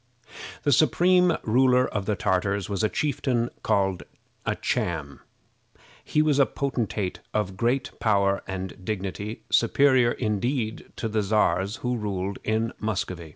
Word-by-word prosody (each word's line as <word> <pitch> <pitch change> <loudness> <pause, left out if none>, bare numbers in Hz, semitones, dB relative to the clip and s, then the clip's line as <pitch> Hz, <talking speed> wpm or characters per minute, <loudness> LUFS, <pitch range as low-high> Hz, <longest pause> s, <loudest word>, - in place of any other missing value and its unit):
The 145 - +2
supreme 175 +5 +4
ruler 125 +2 +4
of 100 -2 -4
the 105 - +1
Tartars 100 +1 0
was 100 +1 -2
a 110 - +3
chieftain 130 -5 -1
called 95 -2 +1 0.5
a - - +1
Cham. 75 -5 -2 0.8
He 150 - +2
was 150 -2 +2
a 140 - +5
potentate 115 -8 -2 0.2
of 95 -3 -1
great 120 +6 0
power 100 -2 +2
and 95 -1 -6
dignity, 100 +2 -4
superior, 125 0 +4
indeed, 110 +1 -2
to 115 - -3
the 110 -1 0
Czars 100 -1 +1
who 125 0 +1
ruled 100 -2 -3
in 110 +1 0
Muscovy. 90 -6 -3
110 Hz, 135 wpm, -25 LUFS, 95-125 Hz, 0.8 s, a